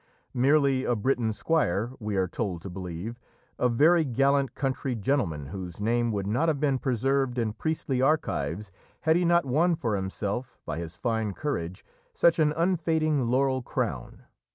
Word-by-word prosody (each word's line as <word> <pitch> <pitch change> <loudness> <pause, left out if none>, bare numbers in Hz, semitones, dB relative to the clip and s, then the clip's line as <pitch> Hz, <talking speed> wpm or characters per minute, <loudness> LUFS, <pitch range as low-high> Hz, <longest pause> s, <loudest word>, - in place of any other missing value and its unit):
Merely 135 0 +3
a 120 - +1
Breton 115 0 0
squire, 115 - 0
we 105 -2 -3
are 95 -1 +1
told 90 -3 -4
to 95 - -6
believe 95 +5 -6 0.4
a 125 - +3
very 160 +8 +4
gallant 140 +1 +1
country 135 -1 -2
gentleman 100 - -1
whose 90 +2 -7
name 120 +2 +1
would 100 -2 -2
not 120 +11 +1
have 150 -3 0
been 140 -3 +1
preserved 135 0 0
in 110 -3 0
priestly 135 0 -2
archives 105 - 0 0.3
had 160 0 +3
he 175 +1 +2
not 170 -1 +4
won 165 +7 +2
for 115 -8 -1
himself, 100 +6 -3
by 80 - -4
his 85 0 -6
fine 110 -4 -1
courage, 90 - -4 0.3
such 170 -1 +4
an 150 -1 +4
unfading 160 -6 +1
laurel 130 +1 +2
crown. 110 - -4
125 Hz, 160 wpm, -27 LUFS, 105-145 Hz, 0.4 s, very